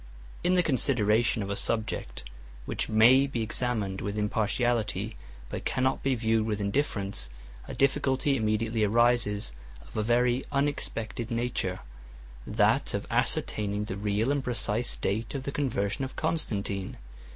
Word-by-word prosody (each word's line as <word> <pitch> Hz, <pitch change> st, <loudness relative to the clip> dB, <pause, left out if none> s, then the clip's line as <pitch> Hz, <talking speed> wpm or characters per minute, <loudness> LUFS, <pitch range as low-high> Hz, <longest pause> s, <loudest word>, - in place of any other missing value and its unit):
In 180 Hz, +1 st, +3 dB
the 180 Hz, -, +4 dB
consideration 115 Hz, -6 st, +2 dB
of 100 Hz, -, -4 dB
a -, -, 0 dB
subject 110 Hz, -, -2 dB, 0.4 s
which -, -, -3 dB
may 120 Hz, +5 st, +6 dB
be 120 Hz, -4 st, -2 dB
examined 110 Hz, -4 st, -2 dB
with 100 Hz, +1 st, -3 dB
impartiality, 110 Hz, 0 st, 0 dB, 0.3 s
but -, -, -5 dB
cannot 130 Hz, +1 st, +1 dB
be 135 Hz, -1 st, +1 dB
viewed 110 Hz, -1 st, +1 dB
with 105 Hz, -2 st, -1 dB
indifference, 100 Hz, -, -1 dB, 0.4 s
a -, -, -6 dB
difficulty 135 Hz, 0 st, +2 dB
immediately 110 Hz, -1 st, 0 dB
arises 110 Hz, -, +2 dB, 0.3 s
of 60 Hz, -, -16 dB
a -, -, +1 dB
very 120 Hz, +3 st, +2 dB
unexpected 125 Hz, -5 st, -1 dB
nature; 115 Hz, -6 st, -1 dB, 0.7 s
that -, -, +2 dB
of -, -, -3 dB
ascertaining 105 Hz, 0 st, 0 dB
the 95 Hz, -, -4 dB
real 105 Hz, +5 st, 0 dB
and 145 Hz, -2 st, 0 dB
precise 120 Hz, -1 st, -1 dB
date 110 Hz, +7 st, -2 dB
of 135 Hz, -, -3 dB
the 140 Hz, -, -3 dB
conversion 125 Hz, -5 st, -1 dB
of 130 Hz, -, -5 dB
Constantine. 100 Hz, -, -2 dB
115 Hz, 140 wpm, -28 LUFS, 105-130 Hz, 0.7 s, may